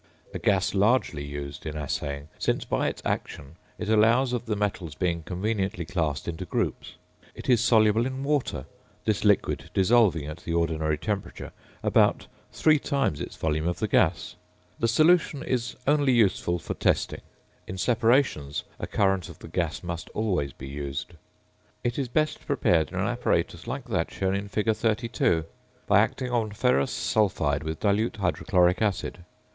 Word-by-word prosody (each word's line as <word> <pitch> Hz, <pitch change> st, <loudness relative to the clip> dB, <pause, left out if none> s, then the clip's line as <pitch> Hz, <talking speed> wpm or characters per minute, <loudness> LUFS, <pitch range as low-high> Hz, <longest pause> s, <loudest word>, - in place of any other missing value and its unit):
A -, -, -4 dB
gas 95 Hz, -3 st, +2 dB
largely 100 Hz, -, +2 dB
used 70 Hz, 0 st, -6 dB
in 75 Hz, 0 st, -4 dB
assaying, 70 Hz, 0 st, -3 dB
since -, -, 0 dB
by -, -, 0 dB
its -, -, -4 dB
action 70 Hz, +2 st, -3 dB, 0.2 s
it -, -, -5 dB
allows 115 Hz, +4 st, +4 dB
of 120 Hz, -1 st, -3 dB
the 105 Hz, -, 0 dB
metals 100 Hz, -7 st, -2 dB
being 85 Hz, -1 st, -1 dB
conveniently 95 Hz, 0 st, -2 dB
classed 80 Hz, -6 st, -2 dB
into 80 Hz, -2 st, -4 dB
groups. -, -, -3 dB, 0.4 s
It -, -, -9 dB
is 120 Hz, -3 st, +4 dB
soluble 115 Hz, -1 st, +4 dB
in 130 Hz, +1 st, -5 dB
water, 140 Hz, -, -1 dB, 0.4 s
this -, -, 0 dB
liquid -, -, +2 dB
dissolving 95 Hz, -6 st, +4 dB
at 75 Hz, +2 st, -6 dB
the 85 Hz, 0 st, -3 dB
ordinary 80 Hz, -2 st, 0 dB
temperature 100 Hz, +4 st, -4 dB, 0.3 s
about -, -, +3 dB, 0.3 s
three 155 Hz, -1 st, +3 dB
times 135 Hz, -, -1 dB
its -, -, -6 dB
volume 80 Hz, +1 st, -1 dB
of 90 Hz, -, -1 dB
the 110 Hz, -, -1 dB
gas. 90 Hz, -3 st, +2 dB, 0.5 s
The 115 Hz, -, +2 dB
solution 155 Hz, +3 st, +3 dB
is 125 Hz, -5 st, -2 dB
only 145 Hz, -2 st, +3 dB
useful 95 Hz, -6 st, +2 dB
for 85 Hz, -, -5 dB
testing. -, -, 0 dB, 0.5 s
In 95 Hz, -, -6 dB
separations, 115 Hz, -, +1 dB, 0.2 s
a -, -, -4 dB
current 95 Hz, -4 st, +1 dB
of -, -, -11 dB
the -, -, -11 dB
gas 80 Hz, -2 st, -2 dB
must 85 Hz, -2 st, -5 dB
always 90 Hz, -11 st, 0 dB
be 65 Hz, -, -10 dB
used. 70 Hz, +3 st, -5 dB, 0.7 s
It 120 Hz, +3 st, -1 dB
is 135 Hz, -, -1 dB
best 155 Hz, +5 st, -1 dB
prepared 85 Hz, -, +2 dB
in -, -, -5 dB
an -, -, +1 dB
apparatus 85 Hz, -, -1 dB
like 135 Hz, -2 st, -4 dB
that 90 Hz, -6 st, 0 dB
shown 95 Hz, 0 st, -1 dB
in 100 Hz, +1 st, -2 dB
fig. 105 Hz, +2 st, 0 dB
32, 110 Hz, -8 st, +1 dB, 0.4 s
by -, -, +5 dB
acting 125 Hz, -1 st, 0 dB
on 115 Hz, -3 st, +1 dB
ferrous 105 Hz, -, +2 dB
sulphide 80 Hz, -9 st, +1 dB
with 80 Hz, 0 st, -4 dB
dilute 105 Hz, +2 st, +1 dB
hydrochloric 90 Hz, -1 st, +2 dB
acid. 95 Hz, -4 st, -1 dB
95 Hz, 160 wpm, -26 LUFS, 80-115 Hz, 0.7 s, by